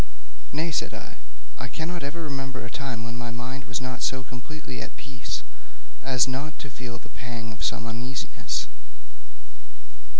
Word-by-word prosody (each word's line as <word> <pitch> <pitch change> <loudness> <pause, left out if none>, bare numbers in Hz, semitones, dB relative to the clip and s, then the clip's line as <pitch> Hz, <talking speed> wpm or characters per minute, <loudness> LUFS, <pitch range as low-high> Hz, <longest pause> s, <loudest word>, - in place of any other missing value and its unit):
'Nay,' 160 +3 +3
said - - +3
I, - - -6 0.4
'I 120 - 0
cannot 160 +8 0
ever 145 +4 0
remember 135 -4 0
a 120 - -4
time 135 -6 0
when 120 +1 -2
my 120 0 -1
mind 125 +3 -2
was 120 - +2 0.2
so 130 0 +4
completely 130 +2 -4
at - - -4
peace 125 - -2 0.6
as 130 -1 +7
not 140 +4 0
to 140 - -4
feel 120 -1 -3
the - - -10
pang 120 -2 -3
of 110 - -3
some - - +3
uneasiness.' 125 +4 +1
130 Hz, 155 wpm, -31 LUFS, 120-140 Hz, 0.6 s, as